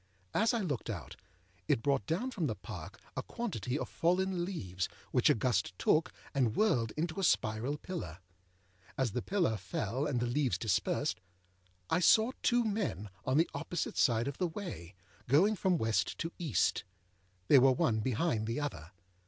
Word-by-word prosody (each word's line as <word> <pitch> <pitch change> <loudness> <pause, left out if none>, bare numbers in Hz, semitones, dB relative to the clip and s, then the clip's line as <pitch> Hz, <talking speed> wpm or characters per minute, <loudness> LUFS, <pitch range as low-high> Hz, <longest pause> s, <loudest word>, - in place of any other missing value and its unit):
As 225 +2 +3
I 235 -3 0
looked 145 - -3
out, - - -5 0.5
it 115 - +2
brought 135 -8 +1
down 235 +11 -1
from 180 -10 -1
the 110 - -2
Park 95 - -9 0.2
a - - -1
quantity 135 - -3
of - - -3
fallen 180 +1 +1
leaves, 95 - -3 0.2
which - - +4
a - - +5
gust 100 -6 0
took, 155 +1 +2 0.2
and 125 -6 +1
whirled 130 - +2
into 160 +3 -2
a - - -1
spiral 120 -1 +1
pillar. 150 - -6 0.8
As 130 -4 +1
the 125 - -2
pillar 175 - +1
fell 105 +8 -2
and 130 -4 0
the 120 - 0
leaves 130 +1 +1
dispersed, 110 -5 0 0.7
I 160 - +2
saw 220 +7 +5
two 240 0 +3
men 195 - -2
on 130 +2 +2
the 165 - +3
opposite 160 +3 -3
side 120 -2 +3
of 140 - -5
the 180 - +2
way, 160 - -7 0.3
going 185 - +4
from 185 -2 +2
West 110 - 0
to 165 - -3
East. 160 - +1 0.6
They 140 - +8
were 135 +1 +6
one 115 -3 +2
behind 115 -1 0
the 115 +5 -1
other. 95 - -5
140 Hz, 170 wpm, -33 LUFS, 110-180 Hz, 0.8 s, They